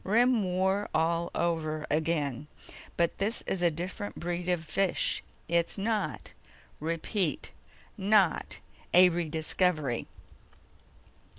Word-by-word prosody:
Rim 235 +3 +3
War 190 +2 0
all 165 +1 +1
over 155 -2 -1
again. 150 -3 0 0.5
But 170 -1 +1
this 210 +4 0
is 190 - -2
a 175 - +5
different 180 +5 -5
breed 175 +1 -3
of 175 -2 0
fish. 185 +4 0 0.3
It's 170 +3 +1
not, 210 0 -2 0.5
repeat, 165 - -2 0.5
not 200 -2 +2 0.3
a 180 0 +8
re 170 -2 -2
discovery." 155 -4 0
175 Hz, 105 wpm, -29 LUFS, 160-190 Hz, 0.5 s, a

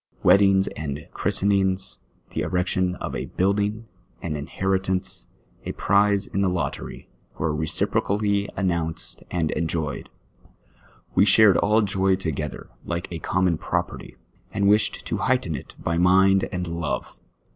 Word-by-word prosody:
Weddings 95 -1 +5
and 75 -1 -6
christenings, 95 -1 0 0.3
the - - -2
erection 90 0 0
of - - -5
a - - -3
building, 100 +4 0 0.3
an 80 -2 -4
inheritance, 95 +5 -2 0.4
a - - -4
prize 100 0 +2
in 100 - -2
the 95 - +3
lottery, 85 -7 -4 0.3
were 80 -1 0
reci 80 +1 0
procally 100 0 0
announced 85 -4 -2
and 85 -3 0
enjoyed. 80 -3 -2 1.0
"We 100 - +5
shared 105 0 +6
all 110 +1 +3
joy 95 -1 +2
together, 80 -6 -4
like 85 0 -4
a 85 - -4
common 90 -1 +1
property, - - -3 0.4
and 100 0 +1
wished 105 +1 +2
to - - -2
heighten 125 -10 0
it 65 - -9
by 85 0 -1
mind 95 +2 +4
and 90 -1 -2
love. 85 -2 -4
95 Hz, 135 wpm, -24 LUFS, 85-100 Hz, 1.0 s, shared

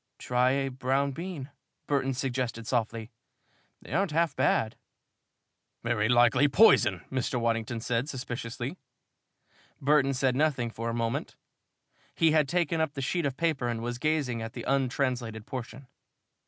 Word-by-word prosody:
"Try 125 +1 +2
a 135 0 0
brown 135 +2 0
bean," 160 -3 -6 0.3
Burton 135 -2 0
suggested 125 -3 -2
softly. 115 -1 -2 0.7
"They - - -8
aren't 190 +3 +2
half 160 -1 +1
bad." 110 - +1 1.1
"Very 115 -2 +1
likely 120 +3 +5
poison," 105 - +5
Mr. 130 -1 -1
Waddington 115 0 -1
said, 120 +4 -1
suspiciously. 125 +2 -5 1.0
Burton 140 -1 +3
said 130 -1 +1
nothing 135 -5 +1
for 115 +1 -4
a - - -2
moment. 115 -1 -2 0.8
He 165 -1 +4
had 150 -3 +3
taken 170 -1 +1
up 160 -3 0
the 135 - -4
sheet 170 +2 0
of 130 -1 -5
paper 155 -7 0
and 120 -1 -2
was 120 0 -3
gazing 145 -6 0
at 115 +1 -6
the - - -6
untranslated 125 -4 -1
portion. 130 +2 -7
130 Hz, 140 wpm, -28 LUFS, 120-145 Hz, 1.1 s, likely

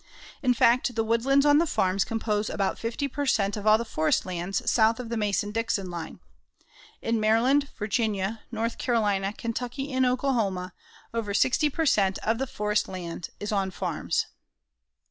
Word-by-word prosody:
In 250 -3 +2
fact 245 +1 +3
the 225 - +1
woodlands 255 +5 +2
on 290 0 +6
the 335 - +2
farms 190 -7 +1
compose 215 -2 -1
about 195 -1 -1
50 235 +5 -2
per 285 +1 -3
cent. 200 -5 +2
of 210 0 -5
all 215 0 +7
the 235 - -4
forest 155 -7 +1
lands 185 +6 -3
south 225 0 +3
of 245 -2 -6
the 235 - -2
Mason 205 -1 0
Dixon 210 -4 -1
line. 170 -1 -7 0.8
In 230 0 +1
Maryland, 245 +7 +3
Virginia, 210 -1 -1
North 230 0 -2
Carolina, 205 -5 +1
Kentucky 245 +5 -4
and 260 0 +2
Oklahoma, 230 -8 0 0.4
over 215 -3 -2
60 260 +6 +3
per 325 +3 -1
cent. 195 -8 +3
of - - -2
all - - +5
the 265 +4 -3
forest 210 -5 -1
land 175 -2 -6
is 205 - -4
on 195 -2 0
farms. 185 - -2
225 Hz, 170 wpm, -26 LUFS, 200-250 Hz, 0.8 s, all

